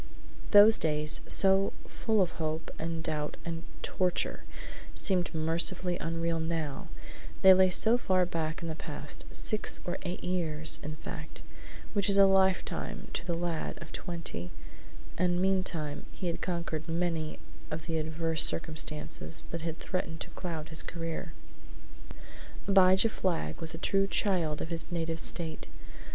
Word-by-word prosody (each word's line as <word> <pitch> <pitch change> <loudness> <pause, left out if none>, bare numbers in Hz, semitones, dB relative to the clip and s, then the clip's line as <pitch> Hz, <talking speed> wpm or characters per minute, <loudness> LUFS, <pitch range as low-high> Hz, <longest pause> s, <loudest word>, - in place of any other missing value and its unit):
Those 210 +1 +8
days, 150 -1 -1
so 195 0 +6
full 220 -3 +1
of 175 - -3
hope 155 0 -3
and 165 0 -3
doubt 150 -2 -2
and 165 -1 -4 0.2
torture, 180 -2 -1 0.5
seemed 185 -3 +2
mercifully 170 +3 0
unreal 165 +1 -1
now, 160 -3 -3 0.6
they 190 0 +10
lay 185 0 +5
so 225 +6 +3
far 185 -5 +2
back 165 -1 -3
in - - -3
the 160 - -3
past 155 - -6
six 215 -1 +1
or 175 +1 -3
eight 180 -1 -5
years, 160 -4 +2
in 150 +1 -5
fact, - - -8 0.5
which 200 -2 +1
is 200 - +7
a 200 - +8
lifetime 190 -1 +1
to - - -3
the 170 - 0
lad 170 -1 -3
of 170 - -10
twenty 165 - -5 0.7
and 175 0 +2
meantime 180 -6 -1
he 190 - -7
had 170 -1 -2
conquered 170 -3 -3
many 165 -2 -1 0.3
of 155 +1 -5
the 165 -2 -1
adverse 160 0 0
circumstances 150 - 0
that 170 - -4
had 165 0 -4
threatened 170 -4 -4
to - - -6
cloud 160 -4 -5
his 160 -1 +1
career. 165 0 -5 1.4
Abijah 190 +1 +5
Flagg 170 - -2
was 160 0 -1
a - - -6
true 195 +3 +1
child 175 -7 +1
of 160 - -7
his 165 +1 -3
native 165 -1 -2
State. 160 0 +1
165 Hz, 145 wpm, -30 LUFS, 160-185 Hz, 1.4 s, they